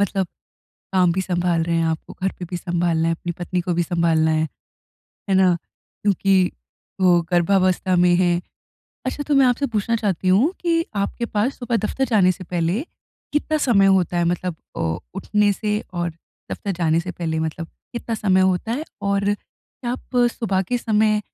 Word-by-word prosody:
मतलब 195 -1 +1 0.7
काम 180 -2 +4
भी 190 - 0
सँभाल 175 -2 0
रहे 170 0 -1
हैं, 165 - +2
आपको 160 -1 -3
घर 190 - +1
पे 180 - -5
भी 180 - -2
सँभालना 170 -2 0
है, 165 - +2
अपनी 175 +1 -5
पत्नी 180 +1 -2
को 175 0 -1
भी 175 - +2
सँभालना 165 -2 +2
है, 155 0 +1 0.8
है 190 - +3
ना, 185 -2 +5 0.5
क्योंकि 195 -2 +3 0.5
वो 175 -2 +5
गर्भावस्था 185 +1 +2
में 175 0 +4
हैं। 175 -1 +2 0.7
अच्छा, 290 - -2
तो 290 0 0
मैं 270 -2 +6
आपसे 250 +3 +2
पूछना 230 0 0
चाहती 195 -4 -1
हूँ 235 - +4
कि 330 -1 +1
आपके 200 +4 -1
पास 220 +5 -1
सुबह 245 -1 0
दफ़्तर 225 +5 -1
जाने 185 -4 +5
से 185 +1 -10
पहले 175 +5 -1 0.5
कितना 305 +1 +1
समय 215 -9 +4
होता 185 -2 +3
है 175 - +2
मतलब 175 0 -1 0.2
अ, 80 +1 -1 0.2
उठने 205 +1 +2
से 210 +1 -1
और 175 -1 -1 0.4
दफ़्तर 200 - -3
जाने 165 -2 +1
से 180 +2 -5
पहले 160 -3 -3
मतलब 160 +1 -3 0.3
कितना 235 -1 -3
समय 190 -3 +2
होता 185 +4 +1
है? 295 +6 -2 0.2
और 200 0 +1
क्या 240 +3 -10
आप 255 0 -6
सुबह 195 -5 -1
के 245 +6 -1
समय 215 -2 +2
185 Hz, 180 wpm, -22 LUFS, 175-210 Hz, 0.8 s, मैं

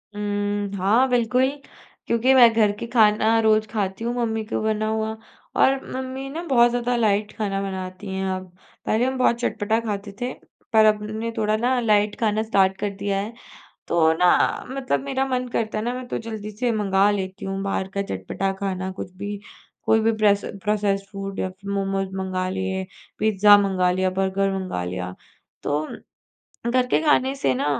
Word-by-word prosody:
उम, 205 -1 -2
हाँ, 215 +8 +3
बिल्कुल, 250 +2 +2 0.6
क्योंकि 235 +3 +3
मैं 245 -3 +8
घर 215 -2 +3
के 235 - -5
खाना 220 0 +4
रोज़ 215 0 +3
खाती 200 0 -2
हूँ 235 - -1
मम्मी 225 -2 -1
का - - -2
बना 215 0 0
हुआ, 220 0 -1 0.4
और 270 0 +3
मम्मी 260 +1 -5
ना 315 +5 -5
बहुत 240 -6 +4
ज़्यादा 245 0 0
लाइट 210 -2 +1
खाना 195 -2 -1
बनाती 190 0 -5
हैं 190 - -2
अब। 185 -1 -8 0.3
पहले 225 +3 +2
हम 260 0 -1
बहुत 250 -2 +3
चटपटा 220 -1 0
खाते 205 -3 -4
थे, 250 +1 -2 0.4
पर 220 -1 +6
अब 210 -1 +3
न 215 +1 -5
ने 230 +1 -3
थोड़ा 215 0 +1
ना 250 +3 +1
लाइट 210 -2 +2
खाना 215 -1 +1
स्टार्ट 195 -3 +2
कर 205 - -1
दिया 200 0 -1
है। 210 +4 -4 0.6
तो 160 -1 +4
ना 180 0 +3
मतलब 265 0 -1
मेरा 270 -1 -1
मन 255 -1 -1
करता 220 -2 -2
है 215 - -3
ना, 245 - -1
मैं 255 0 -6
तो - - -2
जल्दी 220 -2 -6
से 235 +4 -1
मँगा 200 -2 +3
लेती 190 -2 -3
हूँ 195 0 -3
बाहर 195 -1 -2
का 200 - 0
चटपटा 195 - -3
खाना 190 -1 -2
कुछ 185 -1 -7
भी, 205 +1 -5 0.4
कोई 220 - +3
भी 225 +1 +2
प्रेस 205 -2 +3 0.2
प्रोसेस्ड 200 -1 0
फूड 195 -1 -6
या - - -1
फिर 195 +2 -9
मोमोज़ 195 -1 -1
मँगा 185 -1 -2
लिए, 190 0 -2 0.3
पिज़्ज़ा 205 -1 +6
मँगा 190 -3 +2
लिया, 185 +1 +1
बर्गर 195 +1 0
मँगा 185 - -3
लिया। 90 0 -4 0.5
तो 145 +1 0 0.9
घर 250 0 +2
के - - +2
खाने 275 -3 +3
से 135 - +1
ना 125 - -1
210 Hz, 185 wpm, -23 LUFS, 195-230 Hz, 0.9 s, मैं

